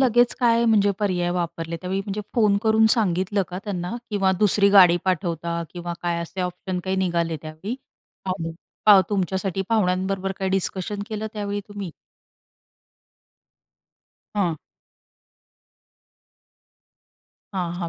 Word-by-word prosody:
लगेच 240 -2 +4
काय, 235 -1 +4
म्हणजे 210 -3 +4
पर्याय 180 -4 0
वापरले 170 -1 -3
त्यावेळी, 190 +1 -2
म्हणजे 200 +1 -4
फोन 210 -4 +4
करून 220 0 +4
सांगितलं 195 -2 +1
का 180 - -5
त्यांना 180 -1 -3 0.2
किंवा 195 -2 +2
दुसरी 205 -1 +4
गाडी 180 -3 +7
पाठवता 170 -2 -1
किंवा 175 -1 -5
काय 170 -1 -1
असे 185 +3 -6
ऑप्शन 180 +1 -3
काय 190 0 -1
निघाले 170 -3 0
त्यावेळी 160 +9 -5 0.5
आणि 170 -3 -2 0.6
तुमच्यासाठी, 190 -1 -1
पाहुण्यांबरोबर 195 -2 0
काही 190 -1 -1
डिस्कशन 195 +2 0
केलं 215 -1 -3
त्यावेळी 205 -2 -3
तुम्ही? 205 -3 -6 2.4
हां. 180 -6 +1 3.0
हां, 180 -3 -1
हां, 170 -2 -3
190 Hz, 115 wpm, -23 LUFS, 175-205 Hz, 3.0 s, गाडी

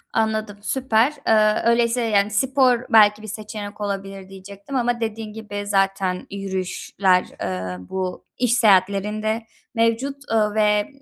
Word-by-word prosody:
Anladım. 220 -2 -1
Süper. 255 +2 +1
Eee, 215 -1 +3
öyleyse, 235 +1 +2
yani, 210 -2 +2
spor 255 +1 +2
belki 210 -2 +5
bir 215 - -9
seçenek 210 0 -7
olabilir 195 -1 -5
diyecektim 200 +6 -10
ama 240 -1 0
dediğin 220 -1 -4
gibi 205 -2 -6
zaten 195 -2 0
yürüyüşler, 190 -1 0 0.2
eee, 90 -1 -3
bu 185 -1 -4
iş 245 -2 +1
seyahatlerinde 215 0 +2 0.3
mevcut, 230 +5 +1 0.2
eee, 225 - +3 0.2
ve 210 -1 +2
210 Hz, 125 wpm, -22 LUFS, 195-225 Hz, 0.3 s, belki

